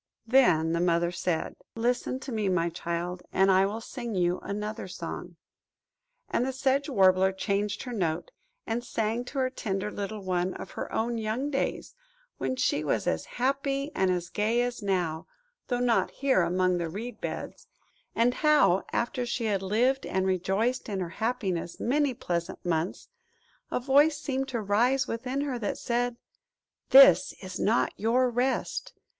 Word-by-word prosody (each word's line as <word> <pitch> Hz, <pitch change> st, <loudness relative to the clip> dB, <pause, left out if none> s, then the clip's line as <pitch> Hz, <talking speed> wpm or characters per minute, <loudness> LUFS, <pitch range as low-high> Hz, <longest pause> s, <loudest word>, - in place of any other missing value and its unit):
Then 180 Hz, -11 st, +4 dB
the 170 Hz, -, +1 dB
Mother 170 Hz, 0 st, +2 dB
said– 175 Hz, -1 st, -2 dB, 0.2 s
"Listen 245 Hz, +2 st, 0 dB
to 270 Hz, -, -6 dB
me, 215 Hz, -4 st, 0 dB
my 170 Hz, -2 st, +1 dB
child, 175 Hz, +1 st, -4 dB
and 190 Hz, +1 st, +4 dB
I 190 Hz, +1 st, +4 dB
will 215 Hz, +3 st, -4 dB
sing 240 Hz, -2 st, -6 dB
you 175 Hz, 0 st, +1 dB
another 210 Hz, 0 st, -4 dB
song." 185 Hz, -, -7 dB, 0.9 s
And -, -, 0 dB
the 265 Hz, -, -1 dB
Sedge 270 Hz, +2 st, 0 dB
Warbler 190 Hz, -5 st, +4 dB
changed 200 Hz, +2 st, -1 dB
her 250 Hz, -, -6 dB
note, 170 Hz, -6 st, -2 dB, 0.3 s
and 235 Hz, +2 st, -2 dB
sang 230 Hz, +1 st, -2 dB
to 275 Hz, -, -8 dB
her 260 Hz, -1 st, +1 dB
tender 205 Hz, -3 st, -3 dB
little 205 Hz, 0 st, -5 dB
one 180 Hz, 0 st, -1 dB
of -, -, -8 dB
her -, -, -6 dB
own 230 Hz, +1 st, -1 dB
young 225 Hz, +7 st, -2 dB
days, 270 Hz, -, -2 dB, 0.5 s
when 260 Hz, -, -1 dB
she 255 Hz, -, +1 dB
was 125 Hz, -7 st, 0 dB
as 80 Hz, -, -1 dB
happy 275 Hz, +2 st, 0 dB
and 190 Hz, -1 st, +1 dB
as 175 Hz, -2 st, -1 dB
gay 225 Hz, +4 st, +1 dB
as 245 Hz, -1 st, -3 dB
now, 180 Hz, -5 st, -1 dB, 0.4 s
though 245 Hz, -1 st, 0 dB
not 245 Hz, -2 st, +2 dB
here 270 Hz, -8 st, +2 dB
among 180 Hz, +1 st, +1 dB
the 170 Hz, -1 st, -2 dB
reed 220 Hz, +7 st, -7 dB
beds; -, -, -6 dB, 0.5 s
and 235 Hz, +2 st, +3 dB
how, 300 Hz, -, +4 dB
after 240 Hz, +1 st, -1 dB
she 240 Hz, -1 st, -2 dB
had 200 Hz, -3 st, 0 dB
lived 240 Hz, +8 st, +1 dB
and 190 Hz, 0 st, 0 dB
rejoiced 195 Hz, +7 st, 0 dB
in 200 Hz, -2 st, -2 dB
her 180 Hz, -2 st, -3 dB
happiness 190 Hz, -5 st, -2 dB
many 280 Hz, +1 st, +1 dB
pleasant 175 Hz, -2 st, -4 dB
months, 170 Hz, +1 st, -1 dB, 0.6 s
a -, -, -1 dB
voice 285 Hz, +4 st, +4 dB
seemed 270 Hz, -3 st, -2 dB
to 240 Hz, -4 st, -2 dB
rise 235 Hz, +6 st, +2 dB
within 255 Hz, +4 st, -2 dB
her 275 Hz, -4 st, -2 dB
that 205 Hz, -, -2 dB
said–"This 270 Hz, -, +3 dB
is 185 Hz, -1 st, -6 dB
not 220 Hz, +4 st, +2 dB
your 245 Hz, +3 st, +2 dB
Rest! 260 Hz, -, -1 dB
220 Hz, 160 wpm, -28 LUFS, 185-250 Hz, 0.9 s, Then